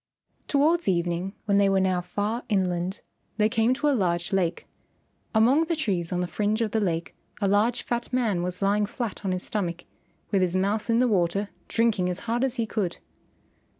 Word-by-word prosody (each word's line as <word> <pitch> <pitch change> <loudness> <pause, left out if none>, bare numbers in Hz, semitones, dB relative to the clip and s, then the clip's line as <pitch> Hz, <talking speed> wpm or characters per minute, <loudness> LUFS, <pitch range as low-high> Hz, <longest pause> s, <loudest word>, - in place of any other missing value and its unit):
Towards 320 +4 +2
evening 175 +1 0
when 200 -2 +3
they 200 -1 +4
were 195 0 +3
now 185 -1 +1
far 205 +6 -2
inland, 185 -2 0 0.4
they 215 -1 +4
came 225 +2 +2
to 295 +3 0
a 290 - +4
large 175 -6 0
lake. 180 -3 0 0.7
Among 255 +9 +5
the 335 0 -1
trees 190 - -1
on 180 0 0
the 180 - -1
fringe 210 +5 0
of 220 -2 0
the 220 - +1
lake 170 -5 -1 0.3
a 200 - +1
large 220 +5 +2
fat 240 0 -3
man 230 -8 +1
was 180 +2 -3
lying 205 +1 +2
flat 225 -2 -5
on 190 - -1
his 185 0 0
stomach 175 -5 -3 0.5
with 195 -3 +3
his 180 -1 +1
mouth 205 +4 0
in 230 - +3
the 250 +1 +4
water 195 -1 +1 0.2
drinking 220 -6 +1
as 180 +1 -4
hard 235 +2 -1
as 265 -2 0
he 230 - 0
could. 210 -5 -2
205 Hz, 195 wpm, -26 LUFS, 180-230 Hz, 0.7 s, Among